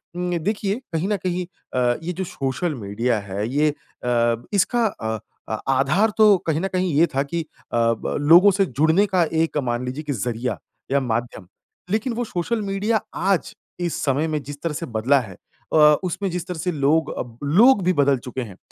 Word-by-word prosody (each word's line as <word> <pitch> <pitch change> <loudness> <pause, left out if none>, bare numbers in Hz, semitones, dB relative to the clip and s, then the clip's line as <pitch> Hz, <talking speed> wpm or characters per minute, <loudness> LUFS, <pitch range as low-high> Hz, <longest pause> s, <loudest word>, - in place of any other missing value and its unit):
उम, 180 0 -1
देखिए 200 +3 -1 0.2
कहीं 165 +3 0
न 210 - +1
कहीं 180 0 -2 0.3
अ, 125 -1 +2
ये 180 +2 -3
जो 190 - -3
सोशल 150 +1 -2
मीडिया 115 +1 -1
है 100 +1 -4
ये 150 +3 +2
अ, 120 -5 -1 0.2
इसका 225 +5 +2
अ 110 - -4 0.3
अ, - - -2 0.2
आधार 155 +12 +3
तो 210 -3 +7
कहीं 160 -1 +1
न 195 - 0
कहीं 185 -2 0
ये 160 +4 +6
था 135 - +2
कि 165 +4 -3 0.3
अ - - +2 0.2
ब - - -3
लोगों 170 +7 +7
से 195 +1 +2
जुड़ने 160 - +3
का 180 - +5 0.2
एक 165 - -2
मान 120 +1 -1
लीजिए 130 +5 -5
की 150 -1 -2
ज़रिया 120 +1 -2 0.3
या 140 - +4
माध्यम। 120 -6 -3 0.4
लेकिन 225 +4 0
वो 240 +1 -2
सोशल 215 +3 -2
मीडिया 205 +2 0
आज 190 -1 0 0.2
इस 175 -2 -2
समय 145 +3 +1
में 155 -2 -2
जिस 145 +1 -9
तरह 165 -2 -1
से 165 +3 -4
बदला 135 +6 +4
है 105 -6 -9 0.4
अ, - - +4 0.3
उसमें 185 +2 -2
जिस 175 0 -4
तरह 180 - -5
से 180 +3 -1
लोग 155 +1 +1
अब, 120 -2 -6
लोग 200 - +5
भी 185 +1 +3
बदल 140 -3 +3
चुके 125 +1 -5
हैं। 100 -6 -8
160 Hz, 200 wpm, -22 LUFS, 125-185 Hz, 0.4 s, तो